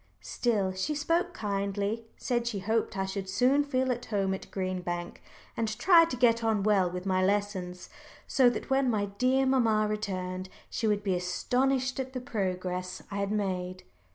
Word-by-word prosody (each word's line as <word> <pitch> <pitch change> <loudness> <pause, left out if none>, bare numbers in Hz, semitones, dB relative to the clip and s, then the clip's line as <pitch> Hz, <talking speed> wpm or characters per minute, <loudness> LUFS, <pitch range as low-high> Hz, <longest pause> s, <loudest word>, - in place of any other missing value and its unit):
Still, 210 -6 0
she 190 +11 -2
spoke 330 +4 +1
kindly 200 - -2
said 240 -2 -1
she 230 -4 -2
hoped 215 +1 -1
I 190 - 0
should 190 0 -4
soon 260 +8 +3
feel 260 -2 0
at 245 0 -3
home 195 -3 0
at 190 - -6
Green 185 -1 -2
Bank, 175 0 -5 0.3
and 230 - 0
try 335 +4 +7
to 290 -6 -4
get 230 -1 +3
on 220 -3 +1
well 195 -4 +3
with 180 +1 -6
my 185 -1 +2
lessons, 190 -2 -1 0.4
so 255 -2 +4
that 245 - -5
when 270 -1 +3
my 210 -3 +1
dear 260 +1 +3
mamma 230 -5 +3
returned 185 -3 -3 0.2
she 225 - -1
would 205 -1 +1
be 195 -2 +1
astonished 255 +9 0
at 260 0 -4
the 255 - -3
progress 185 -6 -3
I 200 - -3
had 200 0 -1
made. 185 -3 -2
210 Hz, 180 wpm, -29 LUFS, 190-250 Hz, 0.4 s, try